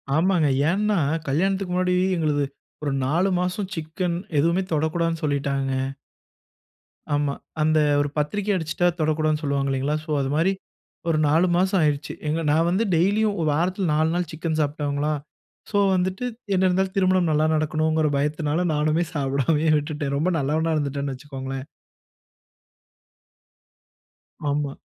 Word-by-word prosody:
ஆமாங்க. 170 Hz, -2 st, +3 dB, 0.2 s
ஏன்னா 210 Hz, +1 st, +1 dB, 0.3 s
கல்யாணத்துக்கு 190 Hz, +5 st, 0 dB
முன்னாடி, 180 Hz, 0 st, +1 dB, 0.2 s
எங்களுது 150 Hz, -3 st, +1 dB, 0.4 s
ஒரு 145 Hz, -, 0 dB
4 175 Hz, +8 st, +2 dB
மாசம் 185 Hz, +2 st, -2 dB
சிக்கன் 165 Hz, +2 st, -2 dB, 0.2 s
எதுவுமே 170 Hz, +5 st, +2 dB
தொடக்கூடாதுனு 165 Hz, +2 st, 0 dB
சொல்லிட்டாங்க. 140 Hz, -2 st, 0 dB, 1.4 s
ஆமா. 145 Hz, -1 st, +1 dB, 0.3 s
அந்த 155 Hz, 0 st, +3 dB, 0.2 s
ஒரு 145 Hz, -, -1 dB
பத்திரிக்கை 200 Hz, +8 st, 0 dB
அடிச்சுட்டா 170 Hz, +1 st, 0 dB
தொடக்கூடாதுன்னு 155 Hz, 0 st, +1 dB
சொல்லுவாங்க 140 Hz, -1 st, 0 dB
இல்லைங்களா? 135 Hz, +3 st, 0 dB
சோ -, -, -15 dB
அது 135 Hz, -, -1 dB
மாரி, 165 Hz, +5 st, +3 dB, 0.6 s
ஒரு 160 Hz, -, +2 dB
4 165 Hz, +5 st, +3 dB
மாசம் 190 Hz, +1 st, +2 dB
ஆயிடிச்சு. 150 Hz, -1 st, 0 dB, 0.4 s
நான் 165 Hz, +3 st, +3 dB
வந்து 190 Hz, +6 st, +1 dB
டெய்லியும் 205 Hz, +5 st, +2 dB
ஒரு 155 Hz, -, +1 dB
வாரத்தில 180 Hz, +4 st, 0 dB
4 155 Hz, +1 st, +2 dB
நாள் 175 Hz, -2 st, -1 dB
சிக்கன் 160 Hz, 0 st, -2 dB
சாப்பிட்ருவங்களா, 145 Hz, 0 st, -1 dB, 0.6 s
சோ 205 Hz, -, +1 dB, 0.2 s
வந்துட்டு 185 Hz, +5 st, -1 dB, 0.3 s
என்ன 190 Hz, 0 st, +3 dB
இருந்தாலும் 190 Hz, +1 st, 0 dB
திருமணம் 185 Hz, -2 st, +3 dB
நல்ல 150 Hz, 0 st, +2 dB
நடக்கணும்கிற 155 Hz, 0 st, +1 dB
பயத்தினால 150 Hz, +3 st, 0 dB
நானுமே 155 Hz, +3 st, +1 dB
சாப்டாமயே 145 Hz, +3 st, +1 dB
விட்டுட்டேன். 145 Hz, -2 st, -3 dB
ரொம்ப 175 Hz, +6 st, +1 dB
நல்லவனா 155 Hz, +4 st, 0 dB
இருந்துட்டேன்னு 140 Hz, -1 st, -2 dB
வைச்சுக்கோங்களேன். 135 Hz, -1 st, -6 dB, 2.8 s
ஆமா. 145 Hz, -1 st, -1 dB
155 Hz, 125 wpm, -24 LUFS, 145-180 Hz, 2.8 s, ஆமாங்க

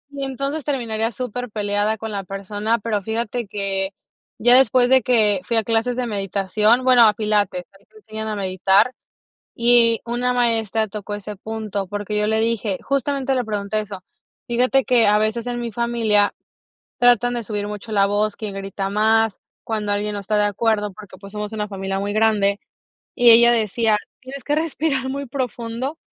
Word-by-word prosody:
Y 275 Hz, -1 st, -3 dB
entonces 275 Hz, +3 st, -3 dB
terminaría 230 Hz, -5 st, -2 dB
superpeleada 215 Hz, -3 st, -2 dB
con 220 Hz, 0 st, -6 dB
la 200 Hz, -1 st, -4 dB
persona, 205 Hz, +4 st, -2 dB
pero 210 Hz, -2 st, -2 dB
fíjate 225 Hz, +2 st, -3 dB
que 195 Hz, -1 st, -3 dB, 0.4 s
ya 245 Hz, +2 st, +5 dB
después 255 Hz, -1 st, +5 dB
de 260 Hz, 0 st, +6 dB
que 215 Hz, -6 st, +2 dB
fui 230 Hz, +5 st, 0 dB
a 225 Hz, -, +2 dB
clases 230 Hz, +2 st, 0 dB
de 250 Hz, 0 st, -2 dB
meditación 210 Hz, +2 st, +1 dB
bueno, 250 Hz, -3 st, +6 dB
a 210 Hz, -, +3 dB
pilates, 205 Hz, -4 st, 0 dB
ahí 200 Hz, -, -29 dB
te 435 Hz, -, -22 dB
enseñan 220 Hz, -, -7 dB
a 215 Hz, -, -3 dB
meditar, 195 Hz, +4 st, +2 dB, 0.6 s
y 235 Hz, -1 st, +4 dB
una 245 Hz, +1 st, -1 dB
maestra 225 Hz, -3 st, 0 dB
tocó 205 Hz, 0 st, -6 dB
ese 205 Hz, 0 st, -8 dB
punto, 215 Hz, -2 st, -4 dB
porque 205 Hz, +2 st, -4 dB
yo 210 Hz, -, +1 dB
le 220 Hz, 0 st, +1 dB
dije, 220 Hz, -4 st, -1 dB
justamente 275 Hz, 0 st, -1 dB
le 250 Hz, -2 st, -1 dB
pregunté 210 Hz, 0 st, -2 dB
eso: 200 Hz, -3 st, -7 dB, 0.4 s
"Fíjate 255 Hz, +2 st, +2 dB
que 245 Hz, -4 st, +3 dB
a 210 Hz, +1 st, +4 dB
veces 220 Hz, +2 st, -1 dB
en 240 Hz, 0 st, -3 dB
mi 235 Hz, -1 st, -4 dB
familia 225 Hz, -3 st, +1 dB, 0.7 s
tratan 245 Hz, 0 st, +4 dB
de 240 Hz, -1 st, -4 dB
subir 205 Hz, -1 st, -3 dB
mucho 210 Hz, +1 st, -7 dB
la 200 Hz, -2 st, +3 dB
voz", 205 Hz, +1 st, 0 dB
quién 215 Hz, -2 st, -6 dB
grita 195 Hz, 0 st, -4 dB
más, 220 Hz, 0 st, +2 dB, 0.2 s
cuando 210 Hz, -2 st, -2 dB
alguien 205 Hz, +1 st, -1 dB
no 205 Hz, -, -4 dB
está 210 Hz, +2 st, -1 dB
de 210 Hz, -, +3 dB
acuerdo, 210 Hz, 0 st, 0 dB
porque, 190 Hz, 0 st, -13 dB
pues, 195 Hz, +1 st, -13 dB
somos 210 Hz, +1 st, -5 dB
una 210 Hz, -1 st, -3 dB
familia 195 Hz, -1 st, -4 dB
muy 200 Hz, +1 st, -2 dB
grande, 210 Hz, -2 st, +2 dB, 0.5 s
y 245 Hz, -1 st, +6 dB
ella 235 Hz, +1 st, +7 dB
decía: 220 Hz, -1 st, +1 dB, 0.2 s
"Tienes 265 Hz, +1 st, -9 dB
que 290 Hz, +4 st, -1 dB
respirar 305 Hz, -4 st, -1 dB
muy 280 Hz, +1 st, -4 dB
profundo", 250 Hz, +2 st, -4 dB
220 Hz, 180 wpm, -21 LUFS, 205-240 Hz, 0.7 s, ella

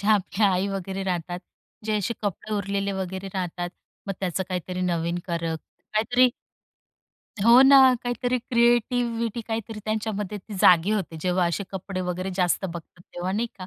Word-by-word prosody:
ज्या 205 Hz, +2 st, +1 dB
आपल्या 205 Hz, +1 st, +2 dB
आई 185 Hz, +2 st, +1 dB
वगैरे 195 Hz, 0 st, -4 dB
राहतात. 175 Hz, -1 st, -2 dB, 0.5 s
जे 215 Hz, -1 st, 0 dB
असे 220 Hz, +3 st, -1 dB
कपडे 205 Hz, +2 st, -3 dB
उरलेले 200 Hz, 0 st, -1 dB
वगैरे 190 Hz, 0 st, -4 dB
राहतात. 175 Hz, -1 st, -3 dB, 0.4 s
मग 195 Hz, -, -1 dB
त्याच 185 Hz, 0 st, -1 dB
काहीतरी 180 Hz, 0 st, -3 dB
नवीन 170 Hz, -1 st, 0 dB
करत 165 Hz, -2 st, -2 dB, 0.4 s
काहीतरी 245 Hz, +4 st, +4 dB, 1.2 s
हो 235 Hz, +3 st, +8 dB
ना, 275 Hz, 0 st, +8 dB, 0.2 s
काहीतरी 245 Hz, +1 st, -1 dB
क्रिएटिव्हीटी 235 Hz, -1 st, +1 dB
काहीतरी 225 Hz, -1 st, -4 dB
त्यांच्यामध्ये 210 Hz, -2 st, -2 dB
ती 205 Hz, +2 st, -10 dB
जागी 180 Hz, +3 st, +6 dB
होते. 185 Hz, -6 st, -2 dB
जेव्हा 180 Hz, 0 st, +1 dB
असे 180 Hz, +4 st, -2 dB
कपडे 190 Hz, 0 st, -4 dB
वगैरे 185 Hz, +1 st, -3 dB
जास्त 180 Hz, +1 st, +1 dB
बघतात, 170 Hz, 0 st, -7 dB
तेव्हा 180 Hz, +2 st, -2 dB
नाही 230 Hz, +4 st, 0 dB
का? 185 Hz, -, -7 dB
195 Hz, 155 wpm, -25 LUFS, 180-220 Hz, 1.2 s, हो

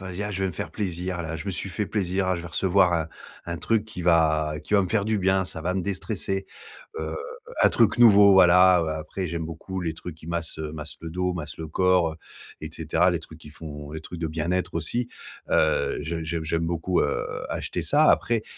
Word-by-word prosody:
vas-y, 95 Hz, +1 st, -5 dB
ah 105 Hz, -, -3 dB
je 95 Hz, -, -4 dB
vais 95 Hz, -, +1 dB
me -, -, -5 dB
faire -, -, -5 dB
plaisir 90 Hz, -3 st, -3 dB
là. 80 Hz, 0 st, -4 dB
Je 100 Hz, -, -8 dB
me -, -, -1 dB
suis 95 Hz, +2 st, -3 dB
fait 100 Hz, +3 st, -2 dB
plaisir, 95 Hz, -2 st, -1 dB
ah 95 Hz, -1 st, +1 dB
je 85 Hz, -, -6 dB
vais 85 Hz, -, -7 dB
recevoir, 90 Hz, 0 st, +3 dB
heu, 80 Hz, -, -7 dB, 0.4 s
un 85 Hz, 0 st, -3 dB
truc 110 Hz, +4 st, 0 dB
qui 105 Hz, -5 st, -8 dB
va 80 Hz, -3 st, +3 dB
qui 105 Hz, -, -1 dB
va 100 Hz, -, +5 dB
me 95 Hz, -, -3 dB
faire 100 Hz, 0 st, +1 dB
du 110 Hz, 0 st, +1 dB
bien. 95 Hz, 0 st, +2 dB
Ça 80 Hz, -3 st, -4 dB
va 90 Hz, +3 st, -1 dB
me 95 Hz, -, 0 dB
déstresser, 95 Hz, 0 st, -2 dB, 0.6 s
heu, 80 Hz, 0 st, -4 dB, 0.5 s
un -, -, +7 dB
truc -, -, +3 dB
nouveau, 105 Hz, -4 st, +8 dB
voilà» 90 Hz, -1 st, +7 dB
heu, 80 Hz, -, -2 dB
après, 80 Hz, +4 st, -4 dB
j'aime 85 Hz, 0 st, -3 dB
beaucoup 90 Hz, +4 st, -6 dB
les 80 Hz, -2 st, -2 dB
trucs 90 Hz, +1 st, -8 dB
qui 80 Hz, -, -14 dB
massent, 85 Hz, -2 st, -2 dB
heu, 75 Hz, -1 st, -4 dB
massent 75 Hz, -1 st, -7 dB
le 80 Hz, -, -6 dB
dos, 90 Hz, +2 st, -1 dB
massent 75 Hz, -4 st, -6 dB
le 80 Hz, -1 st, -6 dB
corps, 90 Hz, 0 st, +2 dB
heu, -, -, -9 dB, 0.5 s
et -, -, -5 dB
cetera. 90 Hz, +3 st, +1 dB
Les 85 Hz, -, -1 dB
trucs 80 Hz, 0 st, -13 dB
qui 75 Hz, -, -12 dB
font 75 Hz, -1 st, -9 dB
les 80 Hz, -, -6 dB
trucs 85 Hz, +2 st, -9 dB
de 80 Hz, -, -1 dB
bien-être 85 Hz, +4 st, -2 dB
aussi, 120 Hz, +10 st, -1 dB, 0.4 s
heu, -, -, +2 dB
je 80 Hz, 0 st, -3 dB
j'aime 80 Hz, 0 st, -3 dB
j'aime 80 Hz, +1 st, 0 dB
beaucoup, 85 Hz, +2 st, 0 dB
heu, -, -, -1 dB, 0.2 s
acheter -, -, -3 dB
ça. -, -, +4 dB
Après, 115 Hz, -2 st, +2 dB
85 Hz, 235 wpm, -25 LUFS, 80-95 Hz, 0.6 s, nouveau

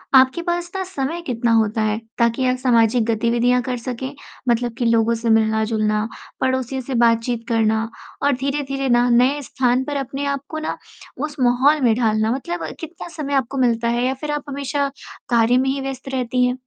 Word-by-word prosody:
आपके 265 Hz, +6 st, +5 dB
पास 345 Hz, 0 st, -2 dB
ना 380 Hz, -, -1 dB
समय 335 Hz, -1 st, -3 dB
कितना 240 Hz, -6 st, -1 dB
होता 220 Hz, 0 st, +2 dB
है 215 Hz, 0 st, +1 dB, 0.2 s
ताकि 235 Hz, +2 st, +2 dB
आप 255 Hz, 0 st, +1 dB
सामाजिक 235 Hz, -2 st, +3 dB
गतिविधियाँ 235 Hz, +2 st, +2 dB
कर 250 Hz, 0 st, -3 dB
सकें? 255 Hz, +3 st, -5 dB, 0.4 s
मतलब 240 Hz, 0 st, +1 dB
कि 240 Hz, -, -1 dB
लोगों 230 Hz, 0 st, +3 dB
से 230 Hz, 0 st, -2 dB
मिलना-जुलना, 220 Hz, -1 st, +2 dB, 0.3 s
पड़ोसियों 260 Hz, 0 st, 0 dB
से 255 Hz, 0 st, -4 dB
बातचीत 230 Hz, 0 st, +2 dB
करना 220 Hz, -1 st, +2 dB, 0.4 s
और 285 Hz, 0 st, +4 dB
धीरे-धीरे 275 Hz, 0 st, -2 dB
ना 240 Hz, +1 st, +4 dB
नए 255 Hz, +5 st, +3 dB
स्थान 255 Hz, -1 st, +1 dB
पर 290 Hz, +1 st, -3 dB
अपने 275 Hz, +1 st, -3 dB
आप 280 Hz, -1 st, -1 dB
को 315 Hz, -, -4 dB
ना 310 Hz, -, -3 dB, 0.4 s
उस 300 Hz, +2 st, -4 dB
माहौल 260 Hz, +5 st, +4 dB
में 235 Hz, -3 st, +4 dB
ढालना 220 Hz, -2 st, +1 dB
मतलब 175 Hz, -10 st, -3 dB
कितना 330 Hz, +2 st, -8 dB
समय 285 Hz, -3 st, -3 dB
आपको 270 Hz, 0 st, 0 dB
मिलता 235 Hz, -2 st, +2 dB
है 245 Hz, -, +1 dB
या 260 Hz, -, +1 dB
फिर 300 Hz, -1 st, -3 dB
आप 295 Hz, -1 st, -2 dB
हमेशा 280 Hz, +1 st, -1 dB, 0.4 s
कार्य 235 Hz, +1 st, +4 dB
में 265 Hz, +1 st, +2 dB
ही 275 Hz, +1 st, -1 dB
व्यस्त 270 Hz, 0 st, -5 dB
रहती 250 Hz, 0 st, +1 dB
हैं? 250 Hz, 0 st, 0 dB
250 Hz, 185 wpm, -21 LUFS, 230-275 Hz, 0.4 s, आपके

